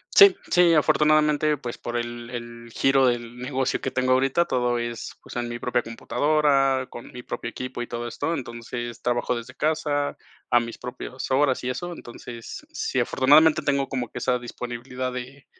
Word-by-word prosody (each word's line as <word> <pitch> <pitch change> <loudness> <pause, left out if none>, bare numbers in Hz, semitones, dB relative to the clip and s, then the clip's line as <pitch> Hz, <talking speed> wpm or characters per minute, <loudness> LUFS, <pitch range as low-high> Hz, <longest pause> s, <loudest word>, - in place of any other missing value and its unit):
Sí, 400 -1 +9 0.2
sí, 175 -2 +5
afortunadamente, 150 0 +3
pues 120 -3 -6
por 120 - -4
el 120 0 -4
el 120 -1 -8
giro 135 -1 +4
del 120 -1 -1
negocio 130 +1 -1
que - - -2
tengo 130 0 +1
ahorita, 135 +6 +3
todo 125 -1 +1
es 120 -1 -4
pues, - - -11
en 120 0 -1
mi 120 0 -4
propia 120 0 0
computadora, 135 +2 +2
con 120 - -10
mi 125 - -8
propio 115 - -5
equipo 130 0 -5
y 120 - -4
todo 120 0 -4
esto. 145 +7 -2
Entonces, 120 -2 -6
trabajo 120 0 0
desde 115 0 -7
casa, 150 -2 0 0.3
a 120 - +6
mis 115 0 -5
propias 125 +1 -6
horas 130 -1 +2
y 125 - -1
eso. 175 +7 -4
Entonces, 120 - -9
sí, 440 +7 -2
afortunadamente 155 +3 +5
tengo 140 -1 +1
como 125 -3 -3
que - - -6
esa 125 0 +1
disponibilidad 125 +1 -5
de 130 +3 -8
125 Hz, 175 wpm, -25 LUFS, 120-145 Hz, 0.3 s, Sí